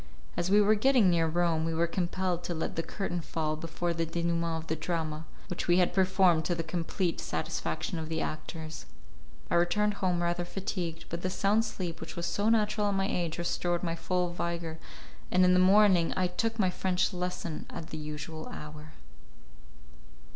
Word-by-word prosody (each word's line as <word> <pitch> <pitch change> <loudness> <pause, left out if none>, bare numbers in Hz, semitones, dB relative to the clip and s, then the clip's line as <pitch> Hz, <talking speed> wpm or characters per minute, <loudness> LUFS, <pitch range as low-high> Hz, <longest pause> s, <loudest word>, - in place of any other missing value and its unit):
As 175 - -1
we 205 +2 +6
were 210 +1 +5
getting 220 -3 +4
near 165 -1 +3
Rome 165 -1 +1
we 165 0 -1
were 165 +1 +3
compelled 175 0 -1
to 175 - -2
let 160 - -3
the 165 - 0
curtain 175 0 -3
fall 155 -1 -2
before 165 +2 -2
the 165 0 -1
denouement 170 0 -1
of - - -15
the 160 - 0
drama 160 -1 -3 0.2
which 180 - -4
we 175 0 +5
had 180 -1 +3
performed 185 -3 +4
to 175 - +1
the 165 - -2
complete 170 +2 -1
satisfaction 175 - -3
of 160 -1 -5
the 160 0 -1
actors. 155 - -5 0.6
I - - +3
returned 210 +4 +2
home 180 -2 +1
rather 175 0 0
fatigued, 175 -2 -4
but 170 +1 -4
the 185 - -1
sound 205 +4 +2
sleep 175 -6 -5
which 160 - -7
was 170 - -2
so 205 +2 +1
natural 210 -2 +2
at 200 - +1
my 195 0 +1
age 170 -4 -1
restored 175 0 -1
my 165 -2 0
full 180 +1 -1
vigour, 170 -2 -3 0.5
and 185 0 +5
in 180 - +5
the 180 - +5
morning 190 -2 +5
I 185 - +3
took 225 +6 -1
my 190 -4 +2
French 185 +1 0
lesson 180 -3 -4
at 165 0 -7
the 155 - -4
usual 150 +1 -6
hour. 150 +1 -9
175 Hz, 190 wpm, -30 LUFS, 165-185 Hz, 0.6 s, we